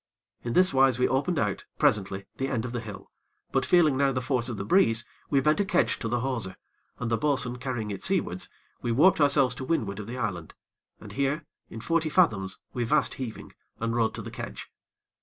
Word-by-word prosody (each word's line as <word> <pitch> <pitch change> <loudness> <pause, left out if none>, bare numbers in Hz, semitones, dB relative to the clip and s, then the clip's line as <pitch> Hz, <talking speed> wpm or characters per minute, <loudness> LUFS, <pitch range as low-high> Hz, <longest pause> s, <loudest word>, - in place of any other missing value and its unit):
In 120 - -3
this 185 0 +4
wise 135 -2 +4
we 125 - +3
opened 145 +6 0
out, 105 -7 -1
presently, 100 -1 +1
the 135 - -1
end 125 -4 -2
of 125 - -4
the 120 - -2
hill; 105 -3 -9 0.4
but - - +1
feeling 160 -6 +5
now 140 0 +3
the 130 - -1
force 125 -1 0
of 115 - -4
the 95 - -4
breeze, 115 - +3 0.2
we 140 - +3
bent 150 +6 +2
a - - +4
kedge 195 - +1
to 115 - -3
the 120 +1 0
hawser, 120 -8 -2 0.4
and, 115 - -3
the 115 - +1
bo'sun 130 -4 +1
carrying 125 -5 -3
it 100 - -5
seawards, 180 - 0 0.3
we 120 - -1
warped 155 +7 +5
ourselves 140 -3 +4
to 130 - -7
windward 110 -9 -1
of 105 - -7
the 120 +2 -5
island, 95 -9 -4 0.4
and - - -11
here, 140 +3 -1 0.2
in 110 - -8
forty 165 +3 +1
fathoms, 105 - +2 0.2
we 120 - -1
vast 145 +5 +2
heaving, 125 -4 -7 0.3
and 115 0 -1
rode 115 -2 +1
to - - -5
the - - -7
kedge. - - -7
125 Hz, 215 wpm, -27 LUFS, 115-140 Hz, 0.4 s, feeling